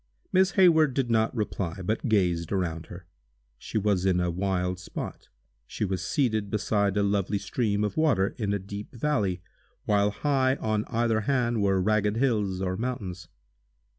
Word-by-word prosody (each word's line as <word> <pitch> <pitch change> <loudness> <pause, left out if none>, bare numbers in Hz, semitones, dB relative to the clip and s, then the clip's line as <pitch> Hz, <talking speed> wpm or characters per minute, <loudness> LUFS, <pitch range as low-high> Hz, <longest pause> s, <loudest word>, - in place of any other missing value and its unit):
Miss 190 +1 +4
Hayward 160 -8 +5
did 130 -4 0
not 110 +1 +2
reply, 100 -5 -3
but 110 +6 -1
gazed 90 -6 +1
around 85 -4 -2
her. 90 0 -10 0.5
She - - -4
was 100 -3 +1
in 95 -2 +2
a 90 -1 0
wild 90 0 -1
spot. 90 - -7 0.4
She - - -3
was 95 -2 -2
seated 110 -7 0
beside 100 -1 0
a 100 - +3
lovely 100 0 0
stream 105 -1 -1
of 105 - -2
water, 120 -12 +2
in 105 -3 -1
a 100 - +1
deep 100 +4 -8
valley, 105 -9 0 0.4
while 105 -1 +3
high 130 +3 +1
on 110 -4 -1
either 115 -2 +1
hand 120 -5 +1
were 95 -1 +2
ragged 105 +1 +1
hills 105 -7 0
or 95 0 -1
mountains. 105 -7 -4
105 Hz, 165 wpm, -27 LUFS, 95-115 Hz, 0.5 s, Hayward